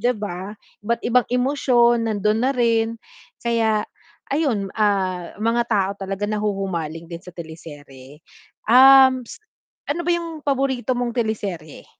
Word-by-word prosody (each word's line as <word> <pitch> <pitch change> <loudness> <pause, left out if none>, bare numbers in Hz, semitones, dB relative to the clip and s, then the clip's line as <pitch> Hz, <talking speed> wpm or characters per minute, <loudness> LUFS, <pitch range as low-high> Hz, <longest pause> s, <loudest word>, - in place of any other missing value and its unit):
'di 245 +3 +1
ba? 200 0 -6 0.3
Iba't 235 +2 -1
ibang 245 0 +2
emosyon, 245 -2 +2
nandun 215 +1 0
na 270 - +2
rin 230 -2 +1 0.5
kaya 220 -2 +1 0.4
ayun, 275 -9 0
ah, 190 -4 0
mga 230 +2 +1
tao 195 -3 +2
talaga 195 +1 -3
nahuhumaling 195 -6 -3
din 170 +1 -8
sa 180 - -11
teleserye. 145 -5 -11 0.5
Um, 260 +1 +7
s - - -10 0.5
ano 335 +4 -1
ba - - +2
yung 330 -3 -5
paborito 265 -2 0
mong 240 -1 -2
teleserye? 200 -9 -4
220 Hz, 130 wpm, -21 LUFS, 190-250 Hz, 0.5 s, Um